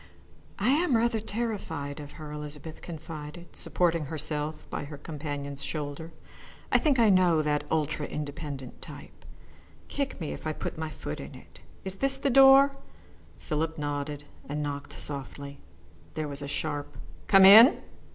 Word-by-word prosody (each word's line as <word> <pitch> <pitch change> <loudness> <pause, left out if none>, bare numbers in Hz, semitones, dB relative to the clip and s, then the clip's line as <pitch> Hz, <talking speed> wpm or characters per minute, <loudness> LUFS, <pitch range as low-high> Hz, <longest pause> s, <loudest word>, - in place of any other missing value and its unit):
"I 210 +4 +1
am 290 -2 +3
rather 230 0 +1
terrified 200 -10 -4
of 145 -1 -9
her," 155 -2 -9
Elizabeth 150 +1 -7
confided, 160 0 -9
supporting 170 -3 +1
herself 150 0 -3
by - - -3
her 145 0 -8
companion's 145 -2 -5
shoulder. 150 +1 -4 0.6
"I - - +5
think 295 -5 +2
I 225 -3 +5
know 175 -4 +4
that 150 -1 0
ultra 155 -1 0
independent 145 -3 -6
type. - - -10 0.7
Kick 280 -1 -3
me 160 - -4
if - - -6
I 155 - -1
put - - -5
my 160 0 -4
foot 75 - -6
in - - -9
it. - - -15 0.2
Is 190 0 -4
this 275 +2 +1
the 275 0 0
door?" 270 +1 +7 0.6
Philip 160 +1 -2
nodded 145 0 -3 0.3
and 150 +1 -2
knocked 140 -1 -5
softly. 140 0 -5 0.6
There 155 -1 -2
was 145 0 -5
a 140 - -5
sharp 145 0 -3 0.3
"Come 195 -1 +8
in!" 225 - +10
155 Hz, 150 wpm, -28 LUFS, 145-195 Hz, 0.7 s, in